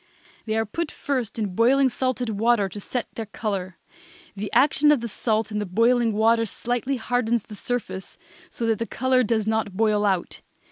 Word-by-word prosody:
They 220 - 0
are 225 - +1
put 330 +9 -3
first 255 -7 -3
in 205 -4 -2
boiling 260 +6 +4
salted 255 -2 -1
water 220 0 +2
to 195 +2 -7
set 245 +4 -3
their 225 -2 -5
color. 195 -4 -4 0.6
The 205 +1 -5
action 290 +3 +4
of 295 - +4
the 235 - -4
salt 220 0 -1
in 210 - -1
the 210 - -2
boiling 230 +4 +3
water 225 +2 +3
slightly 245 +5 -2
hardens 235 -2 0
the 215 - -12
surface 210 -4 -4 0.3
so 235 - -4
that 225 -2 +1
the 230 - -2
color 260 0 +2
does 220 -2 +1
not 220 -3 -1
boil 215 -1 +2
out. 190 -4 -1
225 Hz, 185 wpm, -24 LUFS, 210-245 Hz, 0.6 s, boiling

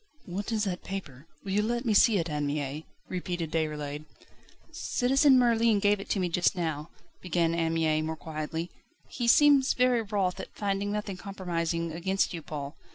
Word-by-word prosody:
"What 195 +5 -4
is 215 -2 0
that 180 -4 -3
paper? 160 -7 -7 0.2
Will 195 - -5
you 205 +2 +2
let 240 +3 -1
me 225 - +2
see 210 +1 +5
it, 170 -2 -1
Anne 150 -2 -2
Mie?" 145 +1 -3 0.2
repeated 175 -3 -4
Déroulède. 150 -2 -2 0.7
"Citizen 270 +2 +3
Merlin 230 -3 +4
gave 205 0 +2
it 195 - -8
to 200 - +1
me 180 - +1
just 175 +2 +1
now," 160 -3 -3 0.3
began 170 -2 +1
Anne 165 -1 0
Mie 155 -1 +2
more 160 0 -3
quietly; 160 +2 -5 0.4
"he 240 -2 -3
seems 280 +1 +5
very 250 -1 +3
wroth 200 -4 -1
at - - -6
finding 200 0 -1
nothing 210 -2 -3
compromising 170 -4 -3
against 190 +4 0
you, 165 - -5
Paul. 145 -1 -6
180 Hz, 175 wpm, -28 LUFS, 160-210 Hz, 0.7 s, see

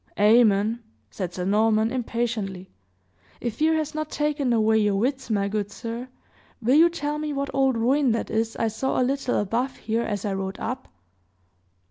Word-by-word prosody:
"Amen!" 215 +1 +4 0.3
said 185 -3 -4
Sir 180 0 -4
Norman, 215 +2 +2
impatiently. 225 -7 -3 0.7
"If 235 -2 -4
fear 320 +1 +3
has 310 -1 -2
not 310 0 -3
taken 295 -3 0
away 220 -1 +3
your 205 -2 +2
wits, 260 +5 -1
my 200 -2 +1
good 205 0 -2
sir, 230 +3 -6 0.5
will 240 +2 +2
you 325 +4 +7
tell 300 -3 -3
me 305 -1 -3
what 280 0 -3
old 270 -2 +2
ruin 260 +3 +2
that 230 - -3
is 225 0 -1
I 225 - 0
saw 225 +5 -1
a - - +3
little 270 -1 0
above 235 +6 -1
here 225 +1 -1
as 205 -3 -3
I 200 - -1
rode 190 0 -4
up?" 255 +3 -4
230 Hz, 175 wpm, -25 LUFS, 210-270 Hz, 0.7 s, you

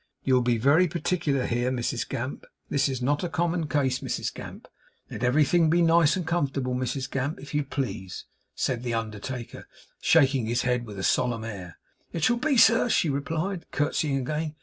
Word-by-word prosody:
'You'll 130 -1 +3
be 120 -1 +1
very 145 +10 +4
particular 165 -5 -1
here, 120 +1 0
Mrs 120 -1 -2
Gamp. 130 +4 -4 0.2
This 140 -1 +1
is 130 -2 -3
not 145 +5 +1
a 175 - -1
common 165 +1 -1
case, 130 -3 +1
Mrs - - -3
Gamp. - - -10 0.4
Let - - -5
everything 155 +6 +3
be 170 - +3
very 170 - +4
nice 165 -2 +5
and 185 -3 -3
comfortable, 140 -6 -1
Mrs 130 +1 -2
Gamp, 135 +3 -3
if 140 +1 -10
you 150 0 +1
please,' 130 -9 -5 0.3
said 125 -3 -1
the 120 -2 -2
undertaker, 115 +2 -5 0.3
shaking 135 -7 +3
his 120 +1 0
head 125 -2 0
with 105 -2 -8
a 95 - -4
solemn 120 -1 +1
air. 95 -7 -7 0.4
'It 165 - -3
shall 240 +5 +3
be, 280 +2 +1
sir,' 230 +1 +5
she 165 -8 +2
replied, 160 +6 -3
curtseying 145 -1 0
again. 150 +4 -3
135 Hz, 185 wpm, -26 LUFS, 125-160 Hz, 0.4 s, nice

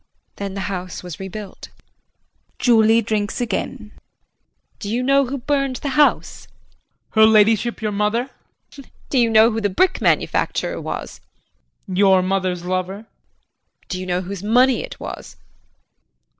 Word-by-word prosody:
Then 200 -1 -5
the 195 - -3
house 185 -2 -5
was 180 -3 -8
rebuilt. 195 +1 -8 0.9
[Julie 225 -1 +4
drinks 210 0 -2
again.] 225 -1 -4 0.9
Do 200 - -6
you 245 +3 -1
know 275 +1 +3
who 275 +3 -3
burned 275 0 -1
the 280 - -4
house? 290 +2 +1
JEAN. - - -30 0.6
Her 220 -1 +6
ladyship, 220 +1 +3
your 215 - 0
mother? 210 +6 -1 0.4
JULIE. 275 -3 -14 0.2
Do 265 - +2
you 235 -1 +3
know 220 +1 +5
who 225 0 -2
the 205 - +1
brick 370 - +1
manufacturer - - 0
was? - - -6 0.7
JEAN. 185 - -5
Your 190 -2 +5
mother's 185 -2 -1
lover? 185 +2 -3
JULIE. - - -42
Do 185 - -3
you 185 - -6
know 180 0 0
whose 190 0 -6
money 245 +5 +3
it - - -9
was? - - -8
215 Hz, 150 wpm, -20 LUFS, 190-245 Hz, 0.9 s, Her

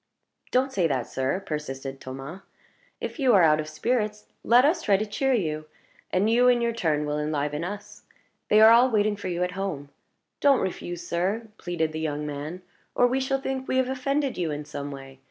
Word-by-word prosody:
"Don't 265 +1 +1
say 180 -7 +2
that, 130 -5 -1
sir," 135 +9 -2
persisted 135 -3 -5
Thomas. 135 +8 -8 0.6
"If - - -6
you 255 -5 +4
are 185 - +6
out 155 -1 +5
of 155 - -3
spirits, 210 +4 -1 0.2
let 245 +3 +5
us 330 +3 +2
try 205 -9 +3
to 215 - -2
cheer 265 +5 0
you. 155 -9 -1 0.4
And 185 +3 +1
you, 240 +2 +4
in 245 -1 +5
your 235 0 0
turn, 155 -9 0
will 150 0 -2
enliven 150 0 -2
us. 205 +3 -7 0.5
They 215 +1 +6
are 220 +1 +9
all 240 +3 +6
waiting 215 -2 +2
for 200 - -6
you 175 0 -1
at 180 - -1
home. 180 -7 -4 0.5
Don't 280 -2 +4
refuse, 175 -2 -4
sir," 195 +7 -1
pleaded 165 -3 -2
the 155 - -5
young 150 -1 -2
man, 150 +5 -6 0.3
"or 245 - +5
we 255 +2 +1
shall 270 +1 0
think 265 -1 -4
we 260 - 0
have 260 -1 +2
offended 275 -1 -1
you 170 -3 0
in 150 0 -4
some 145 0 -6
way. 135 -1 -10
185 Hz, 205 wpm, -26 LUFS, 150-240 Hz, 0.6 s, are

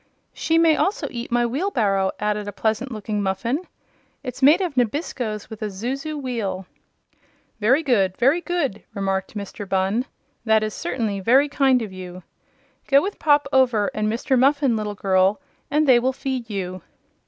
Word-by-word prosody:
"She 325 - 0
may 330 -1 +5
also 370 -5 0
eat 240 0 -6
my 240 0 +2
wheelbarrow," 230 - 0
added 210 0 -1
a - - -3
pleasant 220 +5 -1
looking 215 -1 -3
Muffin. 230 - -2 0.6
"It's 260 +1 -6
made 295 +7 +6
of 355 -7 -2
nabiscos 240 -4 -2
with 220 -1 -10
a 215 - -1
zuzu 265 +10 -4
wheel." 215 -8 -3 0.9
"Very 255 +9 +3
good; 195 -9 +1
very 275 +8 +3
good," 325 - -2
remarked 195 +1 -2
Mr. 200 0 -7
Bunn. 195 +6 +1 0.4
"That 220 -1 +3
is 215 -1 -3
certainly 225 - -2
very 255 +9 +4
kind 270 -4 +2
of 205 -4 -7
you. 185 -1 -9 0.6
Go 275 0 +6
with 390 +7 -4
Pop 290 -1 +3
Over 245 -6 +3
and 215 0 -1
Mr. 255 +3 +1
Muffin, 275 -2 +3
little 210 -1 -3
girl, 190 +2 +2 0.3
and 300 +1 +2
they 250 -2 +7
will 260 +2 0
feed 260 -3 -4
you." 185 -3 -4
235 Hz, 165 wpm, -22 LUFS, 205-275 Hz, 0.9 s, they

